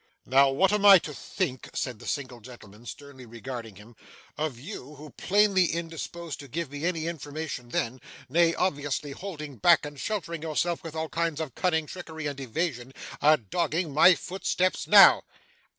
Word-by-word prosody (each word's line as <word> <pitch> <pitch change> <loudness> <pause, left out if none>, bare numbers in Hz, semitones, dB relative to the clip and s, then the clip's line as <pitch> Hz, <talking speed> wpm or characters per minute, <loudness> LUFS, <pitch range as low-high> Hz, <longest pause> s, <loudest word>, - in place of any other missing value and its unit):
'Now, 135 +2 +5
what 185 +9 +2
am 210 -1 +1
I 200 -1 +10
to 155 -3 -6
think,' 145 -5 -4
said 125 -5 -3
the - - -11
single 130 -4 -4
gentleman, 115 -1 -14
sternly 140 -3 -10
regarding 115 -2 -8
him, 105 +4 -15 0.4
'of 150 -5 -3
you, 140 +2 -9
who, 150 +1 -12
plainly 200 -1 +3
indisposed 165 -1 -5
to 140 - -10
give 160 +2 -4
me 145 +2 -5
any 165 -3 -1
information 155 -5 -6
then 120 +1 -2 0.3
nay, 165 +4 +3
obviously 145 -4 -2
holding 150 -5 -8
back, 160 +5 +4
and 145 -1 -9
sheltering 170 -5 -4
yourself 165 +2 -1
with 165 -1 -8
all 160 0 -3
kinds 165 -2 -2
of 155 -6 -4
cunning, 160 -1 0
trickery, 160 -2 -8
and 140 -1 -4
evasion 135 -1 -3 0.3
are 155 +1 +6
dogging 160 - -2
my 170 +5 +7
footsteps 185 0 -2
now? - - +8
150 Hz, 165 wpm, -27 LUFS, 135-170 Hz, 0.4 s, I